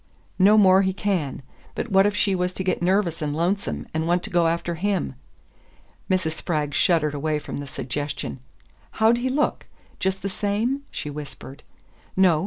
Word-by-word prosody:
"No 205 +3 +6
more 190 -2 +7
he 190 -1 +1
can. 180 -10 -2 0.3
But 230 - -4
what 195 +1 +5
if 205 - -1
she 205 -1 +2
was 180 0 0
to 190 - -4
get 185 -2 0
nervous 175 -2 +1
and 150 -1 -1
lonesome, 180 +5 -1
and 160 +1 -1
want 175 +1 +2
to - - -7
go 175 -2 +3
after 170 +1 -1
him?" 195 +4 -1 1.0
Mrs. 185 -4 +1
Spragg 155 -3 -2
shuddered 155 0 +2
away 150 +1 -1
from 150 - -6
the 145 0 -6
suggestion. 145 +1 -4 0.5
"How'd 225 +2 +3
he 255 +2 -1
look? 295 +3 0 0.3
Just 190 0 -1
the - - 0
same?" 210 +7 -1
she 150 - -5
whispered. 145 -1 -9 0.6
"No. 180 -5 +5
180 Hz, 175 wpm, -24 LUFS, 155-200 Hz, 1.0 s, more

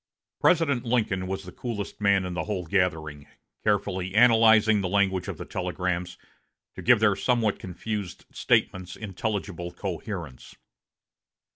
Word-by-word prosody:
President 150 -8 +3
Lincoln 110 -6 0
was 95 +1 -4
the 90 - -10
coolest 105 -1 -6
man 100 -2 +3
in 90 - -4
the 85 -2 -3
whole 95 -4 -3
gathering, 80 -5 -1 0.4
carefully 95 -2 -1
analyzing 110 -2 +6
the 95 - -2
language 95 -2 +1
of - - -5
the - - -7
telegrams, 90 -1 -3 0.6
to - - -8
give 125 -2 +5
their 105 -2 +3
somewhat 115 0 +1
confused 100 +1 -5
statements 90 -1 0
intelligible 95 -4 -4
coherence. 85 - -6
100 Hz, 130 wpm, -26 LUFS, 90-110 Hz, 0.6 s, analyzing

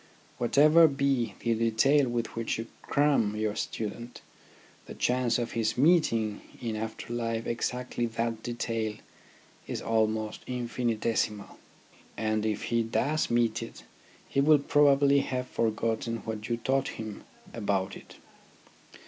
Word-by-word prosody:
Whatever 155 +7 +6
be 135 -4 0
the 115 - +1
detail 115 +5 +3
with 120 -1 -3
which 115 0 -2
you 115 - -4 0.2
cram 140 -8 +2
your 110 -1 -1
student, 115 +3 -5 0.7
the - - -8
chance 125 -2 +1
of 120 -1 -3
his 115 0 -1
meeting 125 -9 +3 0.2
in 115 -3 -3
after 110 +2 -5
life 115 -1 -2
exactly 120 0 -2
that 115 0 -2
detail 115 -2 -2 0.7
is - - -3
almost 110 -1 0
infinitesimal; 115 -3 -2 0.6
and 110 -1 0
if 105 -1 -2
he 115 - +3
does 140 +7 0
meet 120 -1 +1
it, 115 - -9 0.4
he 140 - +1
will 150 +2 +6
probably 140 -1 +4
have 130 -2 -2
forgotten 115 0 -1
what 110 -1 -5
you 120 - 0
taught 135 +3 0
him 110 -2 -7 0.3
about 100 -3 -1
it. - - -13
115 Hz, 130 wpm, -29 LUFS, 110-125 Hz, 0.7 s, Whatever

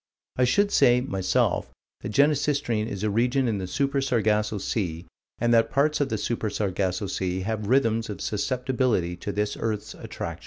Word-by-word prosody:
I 125 - +3
should 200 +11 +2
say, 125 -3 +5
myself, 95 -7 0 0.3
that - - -6
Genesistrine 140 -4 +2
is 100 -3 -5
a 105 - +1
region 125 +4 +1
in 105 -3 -1
the 95 - -4
Super 140 +7 0
Sargasso 110 -4 +1
Sea, 90 -4 -3 0.3
and 120 0 +2
that 115 -1 +4
parts 150 +2 +1
of 140 - +1
the 110 - -1
Super 115 0 -2
Sargasso 100 -1 -1
Sea 95 -1 -2
have 105 +1 -3
rhythms 115 -3 +2
of 105 - -5
susceptibility 125 -5 0
to 100 - -4
this 105 +1 -1
earth's 110 -2 -3
attraction. - - -6
110 Hz, 170 wpm, -25 LUFS, 100-130 Hz, 0.3 s, say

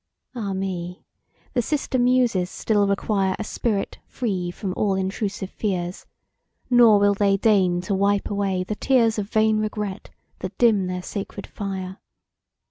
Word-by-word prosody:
Ah 210 -6 -3
me! 180 -2 -4 0.5
the 245 - +2
sister 270 0 -1
Muses 245 -7 +2
still 205 0 +1
require 195 -1 0
A - - -3
spirit 215 -2 -2
free 190 -7 -2
from 185 +2 -4
all 200 -2 +1
intrusive 195 +1 -3
fears, 180 -4 -3 0.6
Nor 235 -4 +7
will 205 0 +4
they 200 -1 +2
deign 190 -4 +3
to 200 +3 -3
wipe 200 +1 +1
away 195 -2 -1
the 200 - -4
tears 230 -1 +2
Of 200 0 -4
vain 220 0 +3
regret, 210 -2 -4 0.3
that - - -6
dim 215 -6 +3
their 180 0 -4
sacred 200 +1 -6
fire. 190 -2 -5
200 Hz, 145 wpm, -23 LUFS, 190-215 Hz, 0.6 s, Nor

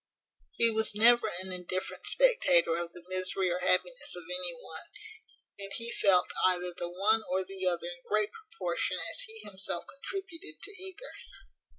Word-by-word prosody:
He 230 0 +4
was 220 -1 +3
never 235 +1 +6
an 185 -1 -5
indifferent 185 +1 -4
spectator 445 - +4
of 170 0 -3
the 175 0 -9
misery 185 0 0
or 175 - -1
happiness - - +1
of 175 - -6
any 180 -1 0
one; 160 0 -7 0.8
and 195 0 -7
he 230 0 -3
felt 185 -5 +3
either 180 -1 +2
the 175 -1 -4
one 205 +5 +2
or 190 +1 +1
the 190 0 -3
other 175 -1 0
in 175 0 -7
great 215 -1 +1
proportion 450 +2 -3
as - - 0
he 445 0 -6
himself 190 -3 0
contributed 330 - -7
to - - +1
either. 380 +5 -8
190 Hz, 165 wpm, -30 LUFS, 180-240 Hz, 0.8 s, never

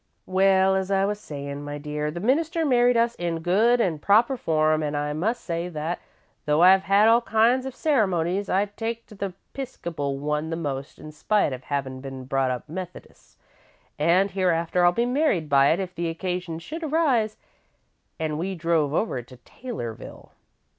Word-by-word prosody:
"Well, 190 0 +3
as 190 0 -1
I 195 0 +2
was 205 +1 -2
sayin', 140 -4 -7
my 145 0 -5
dear, 150 +1 -3
the 165 +3 -5
minister 320 - +1
married 245 -3 +4
us 230 0 +2
in 170 -2 -2
good 215 +8 +3
an' 170 -9 0
proper 225 - +3
form, 155 -7 +1
an' 150 -1 -2
I 145 0 -1
must 215 +11 -2
say 170 0 -3
that, 160 +1 -3 0.5
though 150 +3 +3
I've 190 +1 +7
had 200 +2 +5
all 230 +1 +5
kinds 235 +3 +2
of 265 - -7
ceremonies, 195 - +1
I 195 +2 +2
take 225 +3 -5
to - - -15
the 195 -2 -5 0.2
'Piscopal 170 - -4
one 150 +2 -2
the 165 - -2
most, 140 -4 -5
in 155 0 -10
spite 155 +1 +1
of 130 0 -8
havin' 135 -2 -3
been 135 -1 -7
brought 135 0 0
up 125 +2 -4
Methodis', 180 +3 -9 0.6
an' 180 +6 +3
hereafter 180 -2 +1
I'll 175 - +6
be 235 +7 0
married 250 - +1
by 140 -1 +5
it 165 +5 +2
if 185 -2 -4
the 170 -1 -2
occasion 180 0 -4
should 305 - -7
arise 275 -9 +1 0.8
an' 155 -2 -2
we 190 +3 -3
drove 160 -3 0
over 165 - -1
to 125 +1 -15
Taylorville. 210 - -8
180 Hz, 180 wpm, -25 LUFS, 150-215 Hz, 0.8 s, I've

